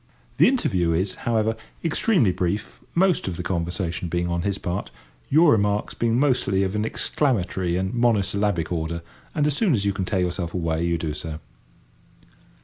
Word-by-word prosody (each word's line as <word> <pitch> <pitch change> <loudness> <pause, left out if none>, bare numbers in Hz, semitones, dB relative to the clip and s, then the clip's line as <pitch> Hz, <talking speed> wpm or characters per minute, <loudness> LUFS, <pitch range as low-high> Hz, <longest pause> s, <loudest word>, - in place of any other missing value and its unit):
The - - +6
interview 95 - +1
is, 95 +3 0 0.2
however, 110 -1 +2 0.3
extremely 165 - +3
brief, 90 +4 -2 0.2
most 185 - +3
of 90 -3 -3
the 90 - -4
conversation 85 0 -2
being 85 +1 -1
on 85 0 -1
his 100 +2 -1
part, 90 +2 -3 0.4
your 155 +2 +6
remarks 105 -1 +1
being 115 0 +1
mostly 125 -9 +2
of 95 +1 -2
an 105 +1 0
exclamatory 95 - 0
and 95 +3 -2
mono 120 -3 +3
syllabic 100 -3 -1
order, 85 0 -2 0.3
and 150 - +2
as 150 -2 +2
soon 190 -1 +2
as 100 -5 +1
you 100 - +2
can 95 -1 -2
tear 95 -1 0
yourself 90 -1 -2
away 80 -2 0
you 85 0 +1
do 80 -2 -3
so. 75 +1 -5
95 Hz, 175 wpm, -24 LUFS, 85-115 Hz, 0.4 s, The